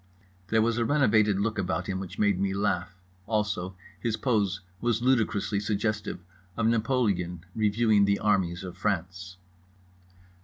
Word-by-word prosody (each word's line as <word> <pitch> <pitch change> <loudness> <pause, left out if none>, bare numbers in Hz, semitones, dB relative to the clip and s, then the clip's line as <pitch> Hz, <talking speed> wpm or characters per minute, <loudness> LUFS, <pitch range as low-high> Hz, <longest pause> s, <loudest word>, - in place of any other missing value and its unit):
There 110 +1 +3
was 115 +1 +1
a - - +2
renovated 110 -7 +3
look 110 +1 -1
about 95 -1 -1
him 95 -1 -3
which 95 -2 -7
made 100 -3 +2
me 95 0 0
laugh. 90 -3 -1 0.3
Also 105 -4 -1 0.2
his 110 +3 -1
pose 100 -6 0 0.2
was 120 -1 0
ludicrously 110 -5 +1
suggestive 105 -1 -2 0.4
of 110 - +1
Napoleon 105 -7 0
reviewing 110 -1 +3
the 100 0 +2
armies 95 -4 +1
of 90 -1 -7
France. 90 -1 -3
105 Hz, 140 wpm, -27 LUFS, 95-110 Hz, 0.4 s, There